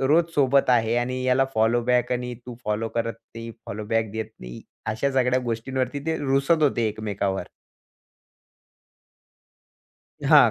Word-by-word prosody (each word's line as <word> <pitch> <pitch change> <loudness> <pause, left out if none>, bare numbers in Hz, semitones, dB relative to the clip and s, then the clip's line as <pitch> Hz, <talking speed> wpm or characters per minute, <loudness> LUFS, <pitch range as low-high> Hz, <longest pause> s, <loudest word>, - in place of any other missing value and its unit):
रोज 155 +6 +4
सोबत 140 -1 +4
आहे 115 -1 +3
आणि 125 +1 -1
याला 130 +1 +4
फॉलोबॅक 120 +2 +2
आणि 125 0 -2
तू 125 - -6
फॉलो 105 +2 -1
करत 115 0 0 0.2
नाही, 115 0 -6 0.2
फॉलो 105 +2 -5
बॅक 115 -1 0
देत 110 0 -4
नाही. - - -9 0.2
अशा 110 +6 0
सगळ्या 130 -1 +3
गोष्टींवरती 130 +3 -2
ते 160 0 +1
रुसत 140 +3 +2
होते 120 -6 +2
एकमेकांवर. 100 -2 -2 2.8
हां. - - +7
120 Hz, 130 wpm, -25 LUFS, 110-130 Hz, 2.8 s, हां